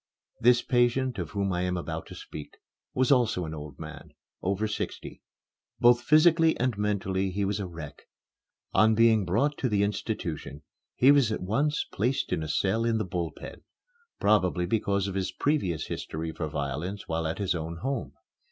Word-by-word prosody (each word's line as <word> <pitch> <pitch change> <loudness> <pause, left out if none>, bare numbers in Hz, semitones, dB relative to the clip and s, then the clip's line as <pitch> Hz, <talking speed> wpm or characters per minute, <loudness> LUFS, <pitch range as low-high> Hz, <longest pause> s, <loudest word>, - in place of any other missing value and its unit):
The 120 +1 +5
patient 125 +1 +2
of - - -3
whom 100 -2 -1
I 90 - -1
am 90 0 -1
about 80 -1 -5
to - - -10
speak 75 - -9 0.4
was 130 +1 +2
also 120 -9 +3
an 80 - -6
old 75 -2 -8
man 80 -2 -10 0.3
over 100 +3 0
sixty. 105 - -5 0.6
Both 120 0 +6
physically 160 +4 +5
and 125 -1 +1
mentally 95 -2 -1
he 100 +2 -1
was 100 +1 -1
a 100 - -3
wreck. 85 -4 -10 0.7
On 110 +2 +5
being 110 -2 +4
brought 135 +12 +1
to 125 - 0
the 100 -2 +2
institution 80 -9 -3 0.3
he 130 +3 +6
was 140 -6 +4
at 110 - -3
once 140 +10 0
placed 125 +6 0
in - - 0
a 80 - -4
cell 95 +8 +1
in 115 -1 +1
the 110 - -1
Bull 90 -2 -2
Pen, - - -10 0.6
probably 90 -5 +2
because 100 0 0
of 100 - -4
his 95 -1 -2
previous 95 - 0
history 80 +1 -4
for 80 0 -4
violence 75 +7 -4
while 80 0 -1
at 80 - -3
his 100 -3 0
own 85 0 -4
home. 130 +9 -3
100 Hz, 180 wpm, -28 LUFS, 85-120 Hz, 0.7 s, Both